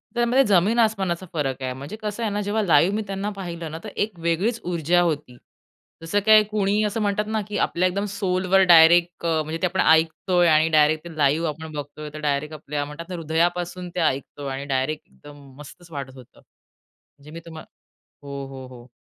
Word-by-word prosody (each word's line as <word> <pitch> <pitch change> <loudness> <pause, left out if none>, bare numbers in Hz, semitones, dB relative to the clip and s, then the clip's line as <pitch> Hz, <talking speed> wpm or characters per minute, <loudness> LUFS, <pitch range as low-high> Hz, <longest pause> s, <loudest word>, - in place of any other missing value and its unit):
त्यामध्ये 240 +3 +3
जमीन 205 +4 +3
आसमानाचा 195 -6 0
फरक 135 -4 -2
आहे. 130 -1 -3
म्हणजे 140 +9 -8
कसं 215 +2 -4
आहे 215 - -1
ना, 205 +1 -2
जेव्हा 205 +2 -1
लाईव्ह 175 +2 +4
मी 215 - -1
त्यांना 195 +1 -3
पाहिलं 170 -4 -6
ना, 160 - -6
तर 215 - -6
1 205 -4 -2
वेगळीच 175 +8 0
ऊर्जा 175 0 +1
होती. 150 -7 -2 0.6
जसं 165 +5 0
काय 215 -1 +7
कुणी 210 0 0
असं 210 +1 -1
म्हणतात 205 0 0
ना 220 -1 0
की 210 - -4
आपल्या 180 +2 +1
एकदम 200 +3 -2
सोलवर 185 -1 +2
डायरेक्ट 170 +1 +5
अ, 160 -2 +1
म्हणजे 155 +2 -4
ते 185 - +3
आपण 190 +2 0
ऐकतोय 165 +3 +3
आणि 155 0 +4
डायरेक्ट 155 0 +3
ते 165 - -10
लाईव्ह 150 +3 +2
आपण 160 +1 -7
बघतोय, 150 +1 -7
तर 155 - -7
डायरेक्ट 150 +1 -1
आपल्या 145 -1 -4
म्हणतात 155 +4 -9
ना, 180 - -4
हृदयापासून 175 +2 -1
ते - - -1
ऐकतो 140 +1 -7
आणि 135 +1 -4
डायरेक्ट 135 +4 -2
एकदम 145 -1 -15
मस्तच 165 +4 -13
वाटत 135 -3 -7
होतं. 125 -3 -16
म्हणजे 145 +1 -23
मी 165 - -8
तुम्हा 160 -2 -9 0.6
हो, 140 -1 -6
हो, 135 -1 -9
हो. 125 -1 -13
170 Hz, 195 wpm, -23 LUFS, 150-195 Hz, 0.6 s, काय